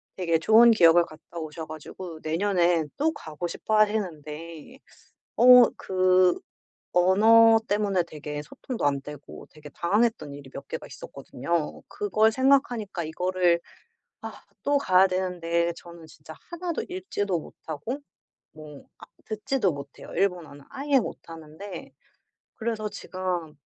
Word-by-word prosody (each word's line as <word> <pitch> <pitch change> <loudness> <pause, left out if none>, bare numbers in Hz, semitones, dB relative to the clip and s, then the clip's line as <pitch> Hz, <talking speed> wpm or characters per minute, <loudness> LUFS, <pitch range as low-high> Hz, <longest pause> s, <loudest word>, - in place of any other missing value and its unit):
되게 165 -3 0
좋은 225 +6 +6
기억을 170 -4 +5
갔다 155 +2 -11
오셔 155 0 -6
가지고 155 +2 -9
내년에 170 -1 +1
또 315 +3 +2
가고 160 - -6
싶어하시는데 170 - -2 0.6
어 250 0 +8
그 185 -1 +2 0.6
언어 225 +5 +6
때문에 200 -3 +1
되게 150 -2 -7
소통도 250 - -6
안 140 -1 +1
되고 145 0 -11
되게 150 -1 -13
당황했던 170 - 0
일이 140 -2 -11
몇 140 - -8
개가 - - -6
있었거든요. 155 +4 -4
그걸 300 - +2
생각하니까 245 -8 +1
이거를 180 +1 +1 0.6
아 - - -7 0.3
또 285 0 +2
가야 190 -7 +4
되는데 175 -2 -1
저는 170 -1 -12
진짜 - - -13 0.2
하나도 345 -1 -3
읽지도 205 - -2
못하고 160 - -7 0.5
뭐 150 -2 -12
아 - - -11 0.2
듣지도 215 -2 -1
못해요 140 -1 -10
일본어는. 170 -7 -2
아예 275 0 +1
못하는데 165 0 -9 0.7
그래서 220 -2 -3
제가 180 -6 -4
180 Hz, 280 characters per minute, -26 LUFS, 160-220 Hz, 0.7 s, 어